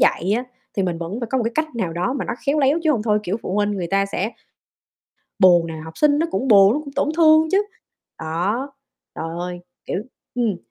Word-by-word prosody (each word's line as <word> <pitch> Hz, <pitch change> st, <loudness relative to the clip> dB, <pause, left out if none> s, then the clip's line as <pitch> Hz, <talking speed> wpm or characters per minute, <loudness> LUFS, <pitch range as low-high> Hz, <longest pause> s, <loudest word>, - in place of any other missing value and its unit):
dạy 185 Hz, +5 st, +2 dB
á 245 Hz, -, -3 dB, 0.3 s
thì 195 Hz, -, +1 dB
mình 175 Hz, -2 st, -2 dB
vẫn 180 Hz, +8 st, -5 dB
phải 235 Hz, -, -2 dB
có 265 Hz, -, +1 dB
một 235 Hz, -, -1 dB
cái 230 Hz, -, -1 dB
cách 310 Hz, -5 st, -2 dB
nào 180 Hz, -7 st, -2 dB
đó 180 Hz, +9 st, -1 dB
mà -, -, -2 dB
nó -, -, -3 dB
khéo 295 Hz, +2 st, +2 dB
léo, 280 Hz, +4 st, +3 dB
chứ 310 Hz, -, +4 dB
hông 220 Hz, -5 st, -1 dB
thôi, 210 Hz, -2 st, +2 dB
kiểu, 205 Hz, +1 st, -2 dB
phụ 185 Hz, -, -3 dB
huynh 205 Hz, 0 st, +1 dB
người 185 Hz, -4 st, -3 dB
ta 195 Hz, +2 st, +1 dB
sẽ 200 Hz, +3 st, -2 dB, 1.1 s
buồn 175 Hz, -2 st, +6 dB
nè, 165 Hz, -, -6 dB
học 160 Hz, -, -11 dB
sinh 295 Hz, -1 st, +4 dB
nó 330 Hz, -, +1 dB
cũng 265 Hz, -, -2 dB
buồn, 200 Hz, -1 st, +7 dB
nó 300 Hz, -, -1 dB
cũng 280 Hz, -, -9 dB
tổn -, -, +1 dB
thương 315 Hz, -1 st, +5 dB
chứ. 410 Hz, +2 st, +3 dB, 0.5 s
Đó, 195 Hz, -, -2 dB, 0.4 s
trời 160 Hz, -, -4 dB
ơi, 175 Hz, 0 st, -5 dB, 0.3 s
kiểu, 190 Hz, -, -2 dB, 0.3 s
ừm, 230 Hz, -6 st, 0 dB
210 Hz, 235 wpm, -21 LUFS, 180-275 Hz, 1.1 s, buồn